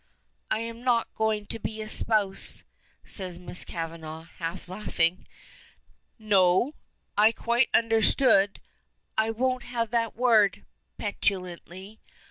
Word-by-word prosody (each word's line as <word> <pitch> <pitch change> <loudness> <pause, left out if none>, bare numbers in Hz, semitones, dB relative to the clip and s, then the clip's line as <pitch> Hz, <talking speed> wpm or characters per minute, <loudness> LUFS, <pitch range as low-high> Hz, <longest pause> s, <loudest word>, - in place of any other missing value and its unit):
"I'm 230 +1 -3
not 240 -2 +1
going 220 -1 0
to 225 - -6
be 220 0 -5
espoused," 215 -2 +2 0.4
says 185 -4 -6
Miss 180 0 -8
Kavanagh, 160 -1 -6 0.2
half 170 +2 -5
laughing. 180 -3 -1 0.9
"No? 205 +3 +3 0.4
I 215 +2 +6
quite 235 +2 +1
understood 225 -2 +3 0.3
" - - -46
"I - - -2
won't 255 +3 0
have 235 -2 -3
that 230 -2 0
word," 220 -5 +3 0.3
petulantly. 190 0 -4
215 Hz, 105 wpm, -27 LUFS, 185-230 Hz, 0.9 s, I